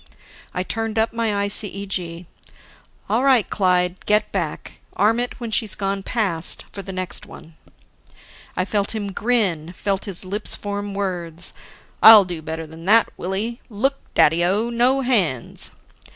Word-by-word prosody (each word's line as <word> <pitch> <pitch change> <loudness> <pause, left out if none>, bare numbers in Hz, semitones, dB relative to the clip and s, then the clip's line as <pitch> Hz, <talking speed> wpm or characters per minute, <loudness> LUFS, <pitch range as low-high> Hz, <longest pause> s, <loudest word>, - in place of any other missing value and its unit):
I 180 - -2
turned 225 +2 -3
up 225 +1 +1
my 230 0 -1 0.2
ICEG. 195 -4 -2 0.8
"All 240 +4 +1
right, 260 -6 +4
Clyde, 180 -2 +1
get 210 0 +2
back. 170 -6 -4
Arm 220 +4 +2
it 245 +1 -3
when 235 -2 -5
she's 215 -1 +1
gone 195 -1 -2
past, 190 -7 +1
for 200 - -6
the 195 0 -8
next 185 -1 -4
one." 160 0 -13 1.0
I 185 - +1
felt 205 +1 -1
him 205 -2 -3
grin, 190 -7 0
felt 195 +1 -2
his 195 -2 -3
lips 205 +3 -1
form 205 -1 -5
words: 175 -4 -3 0.5
"I'll 215 -3 +10
do 175 -3 -6
better 160 +1 -5
than 160 +2 -12
that, 225 +3 +5
Willie. 210 +6 -3
Look, 265 +6 0 0.2
Daddy 165 +3 +4
o, 210 +7 +1
no 250 +3 +2
hands!" 190 - +1
200 Hz, 150 wpm, -21 LUFS, 180-220 Hz, 1.0 s, I'll